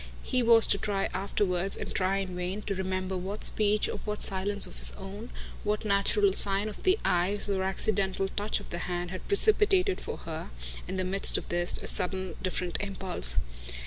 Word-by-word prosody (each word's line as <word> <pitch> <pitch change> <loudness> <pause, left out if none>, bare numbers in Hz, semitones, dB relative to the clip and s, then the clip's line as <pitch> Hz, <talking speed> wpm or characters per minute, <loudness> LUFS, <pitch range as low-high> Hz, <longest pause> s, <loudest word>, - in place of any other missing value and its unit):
He 255 - +1
was 230 -1 +7
to 200 - +4
try 195 -2 -2
afterwards, 190 -1 -1
and - - -6
try 190 +1 0
in 190 -2 -4
vain, 180 +4 -4
to - - -3
remember 185 0 -3
what 190 +3 -5
speech 210 0 +2
or - - -5
what 210 -1 -5
silence 200 +1 +5
of - - -10
his - - +3
own, 200 +5 -9 0.3
what 210 +1 -2
natural 215 - +2
sign 200 +1 +2
of 210 - -8
the 375 +2 +2
eyes 185 +4 +1
or 195 -2 -1
accidental 195 0 -1
touch 205 +2 -2
of - - -13
the 170 - -4
hand, 175 0 -4
had 185 - -8
precipitated 405 -2 +3
for - - -6
her, 160 -1 -7 0.4
in 190 - -5
the 185 - -1
midst 195 +2 +4
of - - -7
this, 175 0 +1
a - - -7
sudden 185 -1 0
different 180 -1 -1
impulse. 190 - -2
195 Hz, 190 wpm, -28 LUFS, 185-210 Hz, 0.4 s, was